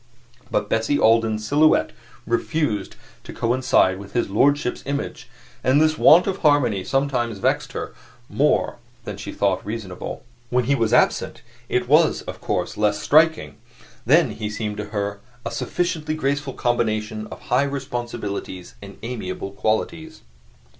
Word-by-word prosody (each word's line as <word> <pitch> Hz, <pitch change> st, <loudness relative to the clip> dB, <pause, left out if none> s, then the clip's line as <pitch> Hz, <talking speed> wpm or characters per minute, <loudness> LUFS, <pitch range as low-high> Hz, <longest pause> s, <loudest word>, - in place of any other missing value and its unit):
But -, -, 0 dB
Bessie 115 Hz, +6 st, +1 dB
Alden's 110 Hz, -2 st, +2 dB
silhouette 155 Hz, +5 st, +3 dB, 0.3 s
refused 115 Hz, -3 st, -1 dB, 0.3 s
to -, -, -9 dB
coincide 115 Hz, -6 st, +2 dB
with 100 Hz, 0 st, -11 dB
his 120 Hz, -5 st, 0 dB
lordship's 140 Hz, +4 st, +2 dB
image, 140 Hz, 0 st, -4 dB, 0.3 s
and 130 Hz, +3 st, +4 dB
this 155 Hz, 0 st, +3 dB
want 165 Hz, +3 st, +6 dB
of 195 Hz, -1 st, -1 dB
harmony 135 Hz, -, +2 dB
sometimes 130 Hz, -5 st, 0 dB
vexed 95 Hz, -, 0 dB
her -, -, -5 dB, 0.3 s
more 145 Hz, -3 st, +1 dB, 0.3 s
than 105 Hz, -3 st, -6 dB
she 105 Hz, -, -6 dB
thought 100 Hz, -2 st, 0 dB
reasonable. 105 Hz, -4 st, -6 dB, 0.3 s
When 125 Hz, 0 st, +2 dB
he 135 Hz, +4 st, +1 dB
was 115 Hz, -5 st, +1 dB
absent -, -, +2 dB, 0.3 s
it 125 Hz, -1 st, 0 dB
was, 155 Hz, +4 st, +4 dB
of -, -, -8 dB
course, -, -, -2 dB
less 105 Hz, 0 st, +1 dB
striking; 160 Hz, +2 st, +3 dB, 0.5 s
then -, -, +4 dB
he 105 Hz, -1 st, -4 dB
seemed 105 Hz, -1 st, -4 dB
to 105 Hz, -, -4 dB
her 100 Hz, -1 st, -3 dB, 0.3 s
a -, -, -3 dB
sufficiently 165 Hz, -3 st, -2 dB
graceful 140 Hz, -2 st, -1 dB
combination 110 Hz, -3 st, -1 dB
of -, -, -10 dB
high 125 Hz, -, +5 dB
responsibilities 120 Hz, -9 st, -4 dB
and 100 Hz, -1 st, -11 dB
amiable 100 Hz, -5 st, -5 dB
qualities. 160 Hz, +11 st, -2 dB
120 Hz, 140 wpm, -22 LUFS, 105-145 Hz, 0.5 s, want